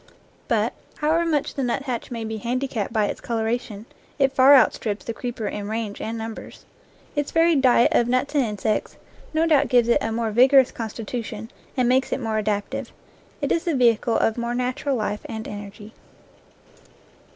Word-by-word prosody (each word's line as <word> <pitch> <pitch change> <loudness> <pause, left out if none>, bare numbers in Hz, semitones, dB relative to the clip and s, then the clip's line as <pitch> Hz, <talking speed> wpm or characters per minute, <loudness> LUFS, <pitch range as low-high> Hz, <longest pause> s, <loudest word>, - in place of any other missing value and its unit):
But, - - +1 0.2
however 325 +3 +1
much 300 -4 0
the 275 - -3
nuthatch 250 0 -2
may 230 -2 -5
be 220 0 -4
handicapped 240 -1 -2
by 215 -2 +2
its - - -4
coloration, 225 -2 -3 0.3
it 270 -2 +2
far 270 +2 +7
outstrips 220 -4 +2
the 230 - -3
creeper 235 -1 -5
in 205 0 -4
range 220 -2 -4
and 225 +1 -4
numbers. 225 0 -8 0.5
Its 290 -1 -1
varied 330 -3 +3
diet 245 -2 +4
of 235 - +3
nuts 255 +4 0
and 285 -3 +3
insects 210 -1 -2 0.3
no 320 +1 +2
doubt 295 -4 +3
gives 240 -2 +4
it 235 - +3
a 225 - -2
more 225 0 -1
vigorous 260 +3 +5
con 225 -2 -5
stitution, 225 0 -6 0.3
and 250 -1 +2
makes 260 +2 +2
it - - -1
more 220 -3 -1
adaptive. 205 -1 -2 0.5
It - - -1
is 330 - +1
the 335 -4 0
vehicle 235 -2 +3
of 225 +1 +1
more 235 0 -2
natural 250 +3 -1
life 210 -2 -2
and 220 -1 -6
energy. 205 +1 -9
235 Hz, 175 wpm, -23 LUFS, 220-265 Hz, 0.5 s, far